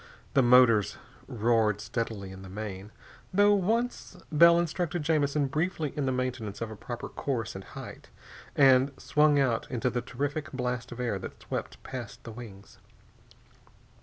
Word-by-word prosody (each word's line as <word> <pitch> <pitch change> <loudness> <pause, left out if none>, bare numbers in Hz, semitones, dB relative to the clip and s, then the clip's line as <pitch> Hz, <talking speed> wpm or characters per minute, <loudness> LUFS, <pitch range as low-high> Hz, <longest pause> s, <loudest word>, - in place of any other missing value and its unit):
The 135 - +5
motors 120 -5 +5 0.3
roared 110 -2 +2
steadily 110 -3 -4
in 95 0 -10
the 95 - -10
main, 100 0 -6 0.4
though 205 +2 +5
once 220 0 -1
Bell 170 +2 +7
instructed 170 -1 -1
Jamison 150 -2 +2
briefly 155 +1 -1
in 145 -3 -1
the - - +2
maintenance 125 -5 -3
of 115 -1 -4
a - - -7
proper 120 +3 -6
course 120 -7 -3
and 95 - -8
height, - - -10 0.5
and 135 0 +5
swung 150 -1 +3
out 125 -5 +1
into 125 0 -1
the 120 - -1
terrific 145 +3 -3
blast 125 -1 -3
of 120 - -8
air 120 -6 -1
that - - -8
swept - - -5
past 125 -2 -7
the 115 - -8
wings. 110 -4 -11
125 Hz, 155 wpm, -29 LUFS, 110-150 Hz, 0.5 s, Bell